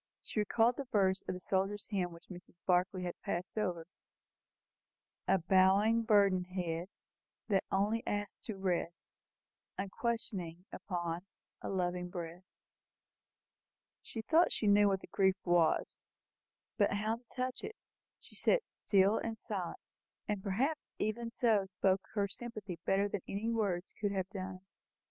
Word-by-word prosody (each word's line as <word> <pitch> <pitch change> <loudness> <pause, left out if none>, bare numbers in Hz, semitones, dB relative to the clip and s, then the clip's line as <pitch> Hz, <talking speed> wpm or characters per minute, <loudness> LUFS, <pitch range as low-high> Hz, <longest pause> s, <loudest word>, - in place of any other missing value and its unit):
She - - -3
recalled 225 +3 +3
the 280 - -3
verse 195 -5 +2
of - - -1
the - - -6
soldier's 195 +2 0
hymn 185 -3 0
which 170 0 -14
Mrs. 180 -1 -11
Barclay 180 0 +2
had 175 -1 -5
passed 175 +2 -3
over 180 -6 -1 1.4
"A - - +5
bowing, 190 +5 +4
burdened 200 -4 +4
head, 175 -2 -2 0.6
That 195 -2 +2
only 210 +4 +2
asks 205 -1 -2
to 215 -4 -4
rest, 175 -3 -2 0.6
Unquestioning, 195 -4 -3
upon 175 0 -3 0.3
A - - -4
loving 180 -1 -1
breast." 175 +1 -9 1.3
She 225 - -6
thought 325 +9 +4
she - - -1
knew 205 0 +6
what 195 -1 +1
the - - -11
grief 190 -1 +3
was; 175 -3 +2 0.8
but 205 - +4
how 215 +3 0
to 240 - -22
touch 255 +2 -3
it? 445 - -5 0.4
She - - -18
sat - - +3
still 200 +1 +3
and 225 -1 -3
silent, 200 -6 -4 0.5
and 210 -3 -1
perhaps 245 +11 0
even 230 +2 -1
so 225 -4 +2
spoke 190 0 +1
her 200 -1 +2
sympathy 210 -4 -6
better 195 +1 +3
than 205 -1 -3
any 215 +4 -1
words 200 -5 -1
could 205 -1 +1
have 190 -1 -1
done 190 -2 -4
it. 185 - -13
195 Hz, 145 wpm, -34 LUFS, 180-215 Hz, 1.4 s, knew